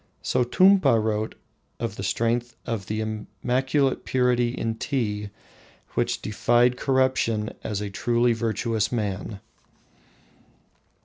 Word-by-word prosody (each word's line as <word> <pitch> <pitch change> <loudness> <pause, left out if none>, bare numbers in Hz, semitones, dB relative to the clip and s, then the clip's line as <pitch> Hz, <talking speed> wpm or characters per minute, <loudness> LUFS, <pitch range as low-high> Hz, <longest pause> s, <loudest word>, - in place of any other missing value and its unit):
Sotumpa 150 - +4
wrote 110 0 -1 0.4
of - - -3
the - - -6
strength 115 +1 -1
of 110 -5 -3
the 110 +1 -2
immaculate 125 +6 -1
purity 125 -2 +2
in 115 -2 -2
tea 105 -4 -2 0.6
which - - -1
defied 120 +4 +3
corruption 130 -5 +1
as 105 -2 -3
a 105 -1 -4
truly 120 +3 +2
virtuous 115 -1 -1
man. 105 -3 -3
115 Hz, 105 wpm, -25 LUFS, 110-125 Hz, 0.6 s, Sotumpa